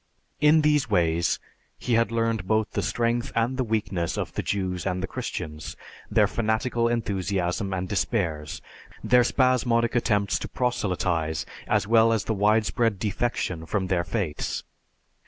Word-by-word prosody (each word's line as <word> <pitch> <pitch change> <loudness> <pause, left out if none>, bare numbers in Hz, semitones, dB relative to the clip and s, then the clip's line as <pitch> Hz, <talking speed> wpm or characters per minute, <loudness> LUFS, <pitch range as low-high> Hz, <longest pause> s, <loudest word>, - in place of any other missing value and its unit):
In 155 +1 +5
these 150 -5 +2
ways 85 -4 +2 0.4
he 125 - -2
had 115 -1 +3
learned 115 -4 0
both 110 0 +1
the - - -1
strength 120 0 -1
and 115 +3 +1
the 130 - 0
weakness 100 -7 -1
of - - -3
the - - -2
Jews 95 -2 -2
and 90 0 -2
Christians; 75 -3 -5 0.3
their 105 - +4
fanatical 115 +3 0
enthusiasm 100 -4 -1
and 95 -1 -2
despairs; 85 -7 -2 0.4
their 125 0 +5
spasmodic 120 -2 +2
attempts 105 -5 +1
to - - -5
proselytize 90 -10 -1 0.2
as - - +2
well 115 +1 +5
as 110 -3 0
the 110 - -1
widespread 110 +1 +2
defection 95 -5 -2
from 100 0 -1
their 85 -2 +1
faiths. 90 -7 -3
105 Hz, 140 wpm, -25 LUFS, 90-115 Hz, 0.4 s, In